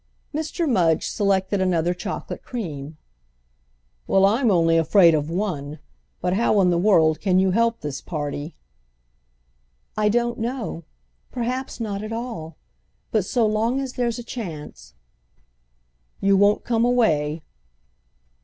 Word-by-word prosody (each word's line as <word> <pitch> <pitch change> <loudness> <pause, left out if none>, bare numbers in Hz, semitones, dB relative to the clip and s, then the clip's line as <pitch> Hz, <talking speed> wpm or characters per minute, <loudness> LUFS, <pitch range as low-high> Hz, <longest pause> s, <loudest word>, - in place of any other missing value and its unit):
Mr. 315 +2 -2
Mudge 175 - +2
selected 195 -1 0
another 175 -2 +1
chocolate 180 - -6
cream. 155 - -6 1.1
"Well, 195 0 +4
I'm 230 +5 +3
only 165 -4 +3
afraid 165 +1 +5
of 150 0 0
one! 160 -6 -3 0.4
But 180 0 0
how 215 0 +2
in 180 -1 +3
the 170 - +2
world 165 -5 +3
can 185 -2 +2
you 190 0 +3
help 230 +3 +1
this 145 -2 -5
party?" 145 -1 -5 1.4
"I 210 0 +2
don't 240 +2 0
know—perhaps 230 - -5
not 205 -3 -3
at 215 +1 -6
all. 225 -10 -6 0.5
But 215 -4 +1
so 235 +3 +1
long 220 +4 +1
as 265 -2 -4
there's 235 -2 -1
a 240 - -6
chance—" 155 - -8 1.2
"You 195 0 +3
won't 205 +1 +3
come 230 -1 +1
away?" 160 -11 +1
195 Hz, 125 wpm, -23 LUFS, 165-230 Hz, 1.4 s, afraid